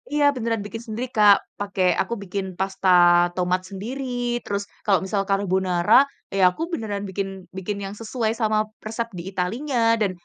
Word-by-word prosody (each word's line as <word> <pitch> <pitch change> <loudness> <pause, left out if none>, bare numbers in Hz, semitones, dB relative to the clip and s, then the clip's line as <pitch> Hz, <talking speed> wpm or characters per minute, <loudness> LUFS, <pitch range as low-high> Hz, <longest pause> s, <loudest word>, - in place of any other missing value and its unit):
iya 295 - +3
beneran 230 -3 -1
bikin 225 +2 -6
sendiri, 230 +4 -3
Kak. 210 -1 +7 0.2
Pake 200 -2 -3 0.2
aku - - -3
bikin 195 +1 -3
pasta 190 0 0 0.5
tomat 180 0 +1
sendiri, 235 +8 -5 0.4
terus 200 0 -2 0.2
kalau 195 -3 +4
misal 195 +1 0
carbonara, 190 -3 +1 0.4
ya - - +2
aku 180 - -8
beneran 205 -6 -3
bikin 195 +1 -2 0.3
bikin 200 +2 -3
yang 195 - -6
sesuai 225 -1 -1
sama 215 -1 +2 0.3
resep 230 +1 -3
di 170 - -5
Italinya, 225 +9 -2 0.2
dan 200 - +2
200 Hz, 160 wpm, -23 LUFS, 190-225 Hz, 0.5 s, Kak